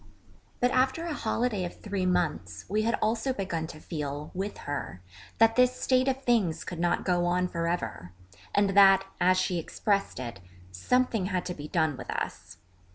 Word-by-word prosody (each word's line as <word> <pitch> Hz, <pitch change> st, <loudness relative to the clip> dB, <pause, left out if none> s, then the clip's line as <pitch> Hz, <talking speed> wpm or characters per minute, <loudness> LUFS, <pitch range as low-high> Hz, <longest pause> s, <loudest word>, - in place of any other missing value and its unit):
But 245 Hz, 0 st, +2 dB
after 265 Hz, +6 st, +1 dB
a 335 Hz, -, -2 dB
holiday 225 Hz, -5 st, -1 dB
of 175 Hz, -, -6 dB
three 200 Hz, -3 st, -2 dB
months, 180 Hz, -3 st, -1 dB
we 210 Hz, +3 st, +1 dB
had 230 Hz, +2 st, +1 dB
also 225 Hz, +4 st, 0 dB
begun 175 Hz, -7 st, -3 dB
to 155 Hz, -, -10 dB
feel, 150 Hz, -2 st, -5 dB
with 195 Hz, +3 st, -4 dB
her, 95 Hz, -, -4 dB, 0.4 s
that 225 Hz, 0 st, +5 dB
this 250 Hz, 0 st, +3 dB
state 255 Hz, 0 st, +2 dB
of 265 Hz, 0 st, -1 dB
things 195 Hz, -11 st, +1 dB
could 175 Hz, -, -6 dB
not 175 Hz, 0 st, +1 dB
go 175 Hz, -1 st, +2 dB
on 180 Hz, +1 st, +1 dB
for 170 Hz, -1 st, -2 dB
ever, 170 Hz, -, -3 dB, 0.4 s
and 205 Hz, -1 st, +3 dB
that 195 Hz, -1 st, +6 dB
as 185 Hz, +1 st, +4 dB
she 180 Hz, -2 st, 0 dB
expressed 200 Hz, +3 st, -1 dB
it 120 Hz, -5 st, -6 dB, 0.3 s
'something 220 Hz, -, +1 dB
had 185 Hz, -2 st, -2 dB
to 180 Hz, -, -3 dB
be 150 Hz, -3 st, -8 dB
done 160 Hz, -4 st, +1 dB
with -, -, -9 dB
us.' -, -, -4 dB
185 Hz, 180 wpm, -28 LUFS, 170-225 Hz, 0.4 s, that